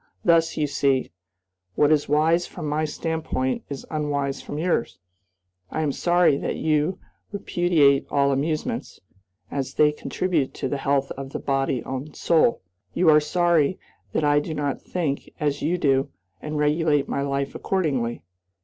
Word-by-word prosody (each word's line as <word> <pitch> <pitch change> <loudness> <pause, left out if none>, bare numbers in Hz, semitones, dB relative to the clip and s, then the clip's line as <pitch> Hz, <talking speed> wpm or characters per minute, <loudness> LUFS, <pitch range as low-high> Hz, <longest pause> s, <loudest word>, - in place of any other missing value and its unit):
Thus, 165 -1 +3
you 150 - +2
see, 140 -2 +1 0.6
what 150 0 +4
is 150 -2 +2
wise 160 +4 +3
from 155 -4 -6
my 150 +1 0
standpoint 155 -4 -2
is 140 -2 -6
unwise 145 -3 -1
from 145 - -6
yours. 160 - -1 0.7
I 155 - -2
am 150 -2 +1
sorry 175 -1 +3
that - - -3
you 155 +3 +1 0.3
repudiate 175 -8 +2
all 140 -1 +2
amusements, 155 - -2 0.5
as 135 -1 -3
they 150 0 +5
contribute 155 -1 -2
to - - -2
the 145 - -2
health 140 0 +1
of 135 0 -6 0.2
body 135 -2 0
and 135 +3 -5
soul. 160 - +2 0.3
You 170 -3 +5
are 150 - +7
sorry 170 +1 +2 0.3
that - - 0
I 145 0 +4
do 155 +2 -4
not 145 -2 -2
think 155 -6 -3
as 145 -1 -1
you 175 +4 +1
do 135 -3 +2 0.3
and 150 0 -4
regulate 150 -1 +2
my - - -2
life 140 0 -2
accordingly. 135 -11 -1
150 Hz, 150 wpm, -24 LUFS, 140-160 Hz, 0.7 s, are